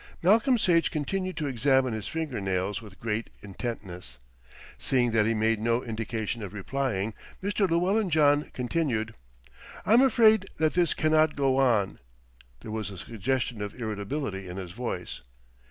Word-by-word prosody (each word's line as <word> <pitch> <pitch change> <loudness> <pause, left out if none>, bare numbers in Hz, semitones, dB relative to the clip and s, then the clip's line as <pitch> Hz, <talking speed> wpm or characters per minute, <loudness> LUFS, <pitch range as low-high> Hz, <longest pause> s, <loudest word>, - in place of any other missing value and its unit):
Malcolm 230 +8 +5
Sage 170 -6 +3
continued 185 +4 -3
to 155 - -2
examine 130 -1 +2
his 110 -2 -4
finger 155 -9 -3
nails 95 +3 -1
with 105 -4 -13
great 115 0 -2
intentness. 95 - -6 0.6
Seeing 125 -3 +2
that 110 -1 +3
he 115 - +1
made 110 0 +2
no 115 +2 +1
indication 115 0 -3
of 100 -2 -6
replying, 110 -1 -2 0.3
Mr. 200 -1 +1
Llewellyn 185 +5 +2
John 150 -2 +3
continued: 125 -4 -1 0.7
"I'm 230 +4 +6
afraid 220 -6 +5
that 155 -1 +2
this 175 -2 +2
cannot 155 0 +3
go 135 -2 +2
on." 115 -7 +2 0.6
There 110 - -8
was 110 -2 -3
a 95 - -9
suggestion 115 +3 -2
of 105 +4 -6
irritability 105 -2 -3
in 90 - -7
his 90 -3 -6
voice. 120 - -5
120 Hz, 150 wpm, -27 LUFS, 105-155 Hz, 0.7 s, I'm